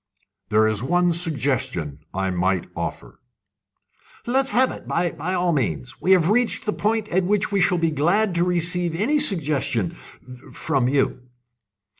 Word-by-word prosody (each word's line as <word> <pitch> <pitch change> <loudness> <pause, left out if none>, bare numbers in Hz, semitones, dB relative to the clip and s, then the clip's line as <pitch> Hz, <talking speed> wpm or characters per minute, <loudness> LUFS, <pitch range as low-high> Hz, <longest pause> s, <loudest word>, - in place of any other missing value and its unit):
"There 110 +1 +3
is 110 -2 -1
one 175 +6 +2
suggestion 130 - -2
I 95 0 -2
might 90 0 0
offer." - - -6 1.1
"Let's 265 +3 +2
have 260 -1 +3
it - - -10
by 175 0 0 0.2
all 175 -1 +1
means. 125 -3 -3
We 190 - +4
have 180 0 +3
reached 240 0 +1
a 210 - +1
point 215 0 -1
at 185 +2 +1
which 205 +3 0
we 200 -2 +1
shall 180 0 +3
be 165 -1 +1
glad 175 +8 +2
to 170 0 +1
receive 175 -1 0
any 255 - +2
suggestion 150 - 0
from 125 0 -5
you." 135 -2 0
170 Hz, 150 wpm, -22 LUFS, 125-190 Hz, 1.1 s, We